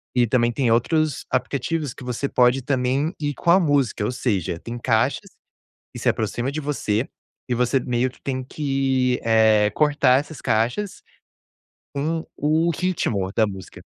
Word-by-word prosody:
e 125 -1 +4
também 120 0 +2
tem 120 0 0
outros 155 +5 +1
aplicativos 140 +3 -2
que 125 - -11
você 125 +3 -2
pode 125 +1 +3
também 135 +4 0
ir 145 -1 -2
com 170 - +1
a 185 - +6
música, 140 - +1
ou 125 - -2
seja, 100 -9 -1
tem 115 +7 -7
caixas 115 -2 0 0.7
e - - -6
se - - -8
aproxima 120 +4 0
de 155 - -3
você, 135 -5 -1 0.4
e 125 - +1
você 125 +2 +1
meio 125 +1 0
que - - -22
tem 130 -1 -3
que, 135 -3 0
eh, 110 -2 +4
cortar 145 0 +3
essas 150 0 -10
caixas, 120 - -1 1.0
com 160 +3 -1
o 155 +3 +1
ritmo 130 - -1
da 110 0 +3
música. 95 -2 -9
130 Hz, 160 wpm, -22 LUFS, 115-145 Hz, 1.0 s, a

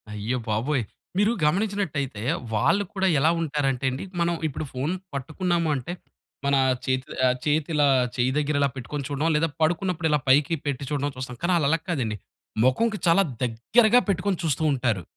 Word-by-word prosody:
అయ్య 105 +4 -2
బాబోయ్! 120 +5 0 0.3
మీరు 205 +3 +3
గమనించినట్టయితే 155 - -1 0.3
వాళ్ళు 195 - +2
కూడా 190 -1 +1
ఎలా 155 +4 +4
ఉంటారంటేండి. 135 -4 -1 0.2
మనం 170 0 +1
ఇప్పుడు 155 +1 -5
ఫోను 140 +8 -2 0.2
పట్టుకున్నాము 165 +4 -1
అంటే, 135 +6 -4 0.5
మన 140 0 +3 0.3
చేతి 130 -1 -1 0.4
చేతిలా 150 0 +2 0.3
చెయ్యి 125 +1 +1
దగ్గర 150 0 0
ఇలా 140 - +3
పెట్టుకొని 135 +2 -5
చూడడం 145 +3 0
లేదా 160 +2 +2
పడుకున్నప్పుడు 165 +1 +1
ఇలా 150 - +3
పైకి 145 +4 +4
పెట్టి 140 -1 -2
చూడడం 145 0 -1
చూస్తాం. 130 -1 -6
కానీ 180 +1 +2
ఆళ్ళలా 160 +1 +2
కాదండి. 120 -11 -1 0.5
మొఖంకి 210 - +2
చాలా 170 +4 +5 0.2
దగ్గరగా 215 - +4
పెట్టుకొని 190 0 0
చూస్తూ 160 -1 0
ఉంటారు. 120 -8 0
150 Hz, 145 wpm, -25 LUFS, 130-170 Hz, 0.5 s, చాలా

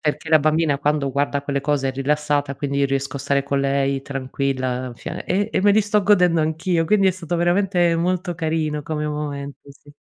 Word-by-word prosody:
perché 150 +1 -2
la 155 - +7
bambina 155 -1 +1
quando 145 -2 0
guarda 140 +1 -1
quelle 140 -1 -2
cose 145 -1 0
è 130 - -2
rilassata 145 +1 0
e - - -11
quindi 140 0 -2
io 140 - +3
riesco 135 +1 -2
a - - -4
stare 140 0 +1
con 140 0 -1
lei 140 0 0
tranquilla 130 -2 -3
fia - - -7
e 200 +3 0
e - - +1
me 205 - +5
li 215 - +4
sto 205 0 +1
godendo 180 -5 +4
anch'io." 165 +2 0
Quindi 195 0 +4
è - - +4
stato 175 -2 -4
veramente 175 0 +2
molto 180 +1 -1
carino 155 -2 -2
come 150 +1 -3
momento, 145 -2 -5
sì. 145 +1 -18
150 Hz, 210 wpm, -21 LUFS, 140-170 Hz, -, la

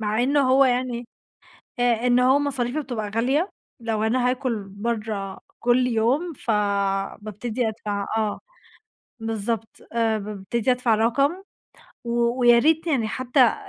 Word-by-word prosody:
مع 215 +2 0
إنّه 285 +3 +3
هو 270 +1 +6
يعني 245 -2 -1 0.7
آآ، 245 0 +2
إن 245 0 +4
هو 260 +3 +4
مصاريفُه 275 0 -1
بتبقى 225 -6 -4
غالية، 275 - +1 0.3
لو 220 -2 -2
أنا 250 +2 +2
هاكل 250 -5 -2
برّه 210 -2 -4 0.2
كل 245 +1 +3
يوم، 250 +9 +1
فبابتدي 210 +2 -1
أدفع 205 -2 -3
آه 215 -2 -1 0.8
بالضبط، 225 0 -3
آآ، 225 -1 +1
بابتدي 210 +4 -2
أدفع 250 -3 +2
رقم، 275 - +1 0.6
و 235 +1 0
وياريت 285 +8 +4
يعني 250 -9 +1
حتّى 255 0 +3
235 Hz, 125 wpm, -24 LUFS, 215-255 Hz, 0.8 s, هو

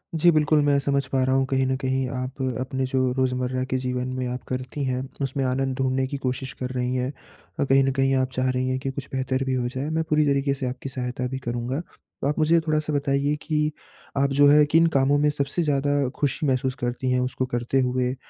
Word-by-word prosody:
जी, 170 +2 +5
बिल्कुल, 150 -1 +3
मैं 145 -1 +3
समझ 140 -1 0
पा 130 -1 +1
रहा 130 +1 +2
हूँ 135 0 +3
कहीं 135 -1 +2
न 130 - +1
कहीं 130 0 0
आप 130 +2 -4 0.2
अपने 130 0 -2
जो 130 -1 +1
रोज़मर्रा 130 0 0
के 130 0 -1
जीवन 125 0 -2
में 130 -1 -2
आप 125 +1 -4
करती 130 +3 -4
हैं, 130 0 -1 0.2
उसमें 135 0 -1
आनंद 130 0 0
ढूँढने 130 0 +1
की 140 - -4
कोशिश 130 +1 -2
कर 125 - -2
रही 125 0 -1
हैं। 125 +2 -1 0.5
अ, - - +3
कहीं 135 0 +4
न 135 - +2
कहीं 135 0 +3
आप 130 0 +1
चाह 130 0 0
रही 130 0 0
हैं 130 - 0
कि 135 0 -3
कुछ 140 +1 -6
बेहतर 130 0 -1
भी 130 - 0
हो 125 -1 0
जाए 130 +4 -3
मैं 160 0 0
पूरी 150 0 +3
तरीक़े 140 0 +2
से 135 -1 -4
आपकी 130 +2 -6
सहायता 125 -1 -3
भी 130 +1 -4
करूँगा। 120 +3 -3
तो 140 - -9
आप 150 +2 -1
मुझे 165 +2 +4
थोड़ा-सा 155 0 0
बताइए 140 +1 +1
कि, 150 -1 0 0.5
आप 140 0 +3
जो 145 - +8
है 150 +1 +7
किन 165 +1 +5
कामों 140 +2 +3
में 150 +1 +3
सबसे 145 +4 -1
ज़्यादा 145 -2 +1
ख़ुशी 145 +1 0
महसूस 130 0 0
करती 125 +1 -1
हैं? 125 - +2
उसको 130 +1 -1
करते 120 +2 0
हुए 125 0 0
130 Hz, 235 wpm, -24 LUFS, 130-140 Hz, 0.5 s, जो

